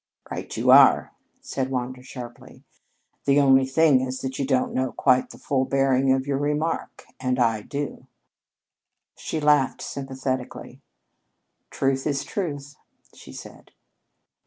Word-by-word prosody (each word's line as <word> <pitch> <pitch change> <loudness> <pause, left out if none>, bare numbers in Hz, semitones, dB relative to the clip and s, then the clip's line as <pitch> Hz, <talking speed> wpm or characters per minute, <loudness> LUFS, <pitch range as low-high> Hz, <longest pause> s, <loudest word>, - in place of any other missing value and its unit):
"Right - - -6
you - - +3
are!" - - +6 0.3
said 130 -1 -3
Wander 130 0 -4
sharply. 125 -2 -11 0.6
"The 140 +1 +4
only 135 -1 +5
thing 140 -1 +4
is 130 0 -3
that 130 0 -5
you 135 - -1
don't 130 -2 +1
know 130 0 -1
quite 130 -2 +2
the - - -12
full 135 -2 0
bearing 135 0 +2
of 130 0 +1
your 140 -1 -1
remark 150 +3 -2
and 130 -1 -1
I 115 -3 +1
do." 140 +2 -6 1.1
She 160 - -4
laughed 145 -4 +2
sympathetically. 130 -2 -5 0.9
"Truth 135 +1 -1
is 140 -2 -1
truth," 145 -7 -5 0.4
she - - -14
said. - - -12
135 Hz, 135 wpm, -24 LUFS, 130-140 Hz, 1.1 s, are